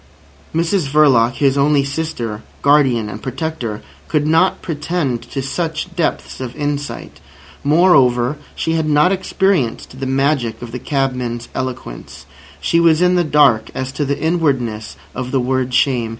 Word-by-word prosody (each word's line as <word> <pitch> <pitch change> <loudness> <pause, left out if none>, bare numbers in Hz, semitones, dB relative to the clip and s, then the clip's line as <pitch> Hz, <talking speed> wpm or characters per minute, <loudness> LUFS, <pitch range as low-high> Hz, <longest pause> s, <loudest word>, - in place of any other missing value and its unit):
Mrs 170 -2 +1
Verloc, 135 -5 +4
his 140 -1 +2
only 145 0 +3
sister, 140 -7 -4 0.2
guardian, 135 -6 +3
and 105 +1 -7
protector, 130 - -4 0.2
could 150 -1 0
not 165 +4 +2
pretend 150 -6 -2
to 135 - -3
such 165 +4 -3
depths 170 -3 -2
of 125 -1 -6
insight. 145 -1 -4 0.4
Moreover, 140 -5 +4 0.2
she 160 - -1
had 160 -1 0
not 150 +5 +4
experienced 185 - -1
the 135 - -3
magic 135 -4 0
of 120 - -8
the 125 - -5
cabman's 125 -4 -2
eloquence. 130 - -6 0.3
She 170 - +1
was 165 -2 +4
in 180 0 +4
the 175 -1 +3
dark 150 -8 +3
as 130 0 -3
to 145 - -2
the 140 0 -2
inwardness 135 -10 -1 0.2
of 125 - -4
the 135 - +1
word 130 0 -1
"Shame." 125 -3 +1
140 Hz, 150 wpm, -18 LUFS, 125-160 Hz, 0.4 s, Verloc